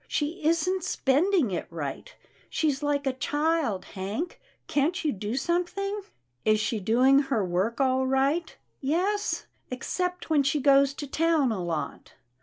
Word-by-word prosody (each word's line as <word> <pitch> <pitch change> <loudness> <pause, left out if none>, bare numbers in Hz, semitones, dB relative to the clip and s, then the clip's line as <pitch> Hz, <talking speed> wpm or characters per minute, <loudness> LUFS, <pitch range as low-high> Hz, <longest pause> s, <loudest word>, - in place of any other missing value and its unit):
She 315 +3 -2
isn't 335 +3 +1
spending 295 - +2
it 180 - -3
right. 165 - -5 0.4
She's 300 -3 0
like 290 -1 0
a 265 - +1
child, 290 - 0
Hank. 205 - -5 0.2
Can't 320 +5 0
you 300 - +3
do 210 +2 -4
something?" 360 +7 -1 0.2
" - - -50 0.2
Is 215 0 +3
she 215 +1 -1
doing 250 +7 +4
her 270 -8 0
work 185 +6 -1
all 260 -1 +2
right? 275 +6 +1
'* - - -47
" - - -46
Yes, 375 +9 0 0.2
except 360 +8 -3
when 310 -3 +3
she 275 +2 +1
goes 275 0 +4
to 290 - -5
town 310 -2 +2
a 190 -5 -2
lot." 165 -3 -4
280 Hz, 160 wpm, -27 LUFS, 235-330 Hz, 0.4 s, doing